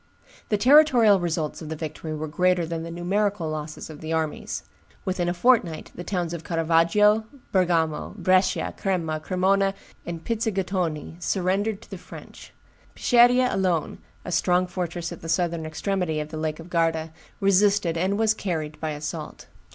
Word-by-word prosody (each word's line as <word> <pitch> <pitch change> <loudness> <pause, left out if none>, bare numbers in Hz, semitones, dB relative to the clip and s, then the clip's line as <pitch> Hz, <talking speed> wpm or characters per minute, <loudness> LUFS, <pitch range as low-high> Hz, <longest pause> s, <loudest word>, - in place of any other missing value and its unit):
The 210 - +2
territorial 245 -4 +6
results 165 -3 -2
of 155 - -7
the 160 - -3
victory 155 0 -5
were 155 +1 -4
greater 180 +2 +2
than 165 0 -4
the 165 - -6
numerical 190 +1 -1
losses 155 0 -6
of 155 -2 -11
the 160 0 -5
armies. 160 -2 -2 0.4
Within 180 -2 0
a - - 0
fortnight, 180 -6 +2
the 175 - -7
towns 175 -3 -2
of 165 -2 -6
Caravaggio, 170 +7 +3 0.3
Bergamo, 170 -3 +1
Brescia, 185 0 +2
Crema, 165 -5 -1
Cremona, 195 +3 +1 0.3
and 165 -1 -6
Pizzighitone 190 -7 -2
surrendered 195 +4 0
to - - -18
the - - -6
French. - - -12 0.4
Peschiera 245 +1 +4
alone, 180 -5 0 0.3
a - - -5
strong 180 +1 +2
fortress 175 -1 -4
at 175 - -8
the 165 - -7
southern 170 -2 0
extremity 175 0 -1
of 150 0 -4
the 160 - -7
Lake 155 0 -2
of 170 +2 -11
Garda, 165 -1 0 0.3
resisted, 195 -2 +3
and 190 +4 0
was 220 0 +3
carried 160 -8 -4
by 160 - -2
assault. 150 -1 -6
175 Hz, 160 wpm, -25 LUFS, 160-195 Hz, 0.4 s, territorial